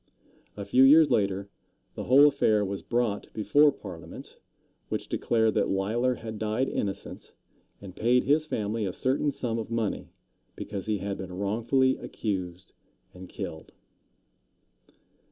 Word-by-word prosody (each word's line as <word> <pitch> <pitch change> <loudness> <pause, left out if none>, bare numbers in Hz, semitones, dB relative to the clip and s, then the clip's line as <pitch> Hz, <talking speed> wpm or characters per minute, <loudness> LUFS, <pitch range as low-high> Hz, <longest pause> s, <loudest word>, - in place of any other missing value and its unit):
A 100 - -5
few 125 +6 +3
years 150 +3 +7
later, 100 -1 0 0.5
the - - -6
whole 135 +3 +7
affair 110 -8 +3
was 100 0 -4
brought 120 -4 -2
before 145 +7 +4
Parliament, 95 -10 -11 0.5
which - - -3
declared 110 -2 +1
that - - +1
Leisler 115 +6 0
had 110 -2 -8
died 110 +5 0
innocent, 100 -1 -5 0.5
and 95 -2 -11
paid 125 +2 +2
his 150 +3 +2
family 110 -3 -2
a 95 -3 -2
certain 135 +3 0
sum 120 -4 -3
of 110 - -6
money 115 -3 -2 0.5
because 100 -2 -6
he 105 -1 0
had 100 0 -4
been 95 -1 -7
wrongfully 115 +7 +1
accused 90 -4 -5 0.4
and 90 0 -11
killed. 80 0 -7
110 Hz, 135 wpm, -27 LUFS, 100-125 Hz, 0.5 s, years